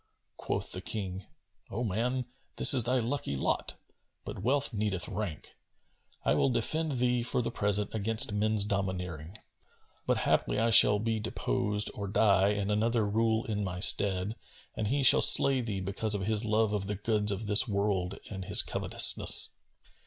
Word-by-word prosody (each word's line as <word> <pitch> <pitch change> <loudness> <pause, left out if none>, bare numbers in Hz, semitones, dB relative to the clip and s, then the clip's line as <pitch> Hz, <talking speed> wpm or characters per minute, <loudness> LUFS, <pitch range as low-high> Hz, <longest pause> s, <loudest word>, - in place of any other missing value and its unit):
Quoth - - -5
the - - -4
King, 95 -3 -7 0.4
O 115 +5 -5
man 120 +4 -3 0.3
this - - +7
is 125 -4 +3
thy 125 +2 0
lucky 125 - -4
lot; 65 - -3 0.5
but - - -8
wealth 140 +1 0
needeth 100 -5 -3
rank,[FN#251] 100 -8 -7 0.7
I - - +2
will - - 0
defend 155 +6 -2
thee 125 -1 -1
for 120 +1 -1
the - - -4
present 105 0 -2
against 110 +1 +2
men's 105 0 +2
domineering; 95 -4 -5 0.7
but - - 0
haply - - -1
I 115 +2 0
shall 105 -2 +6
be 110 +1 -3
deposed 105 -1 -1
or 100 -1 -7
die 100 -2 +2
and 105 0 -3
another 110 +1 -1
rule 110 +1 -1
in 105 -2 -4
my 90 -2 -6
stead, 95 +2 +3 0.4
and 110 - -4
he 140 +5 -1
shall 130 - +7
slay 135 -2 +6
thee 105 -5 -5
because 100 +3 0
of 95 -2 -4
his 110 +1 +1
love 110 -1 -1
of 100 -2 -4
the 105 - -4
goods 105 0 -1
of 100 +2 -5
this 105 +5 +5
world 100 -3 -3
and 95 -2 -8
his - - +3
covetousness. - - +2
105 Hz, 165 wpm, -28 LUFS, 100-115 Hz, 0.7 s, this